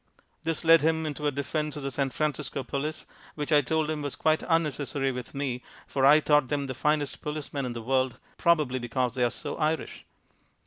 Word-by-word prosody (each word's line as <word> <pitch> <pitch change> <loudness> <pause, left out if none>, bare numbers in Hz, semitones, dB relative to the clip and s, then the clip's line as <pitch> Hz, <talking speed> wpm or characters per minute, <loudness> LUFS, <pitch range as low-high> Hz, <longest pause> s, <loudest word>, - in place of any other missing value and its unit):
This 165 +1 -2
led 165 0 +7
him 160 +1 +1
into 150 0 -2
a - - +2
defense 150 +2 -2
of 145 - -6
the 140 - -2
San 135 +1 0
Francisco 150 0 -2
police, 150 +4 -3 0.3
which 150 +1 -4
I 150 -1 +6
told 155 +3 0
him 155 -1 -2
was 145 -2 -3
quite 155 0 +2
unnecessary 145 -4 +1
with 125 +2 -7
me 135 -3 -2 0.2
for 135 -1 +2
I 150 +2 +8
thought 150 -3 +3
them 140 +1 -1
the 130 - -4
finest 150 +2 0
policemen 150 -3 -3
in 120 - -4
the 115 -1 -6
world, 130 0 +1 0.2
probably 150 -7 +2
because 120 +1 -1
they 125 -1 0
are 120 - +3
so 145 - -5
Irish. 155 +1 -1
145 Hz, 200 wpm, -28 LUFS, 130-155 Hz, 0.3 s, I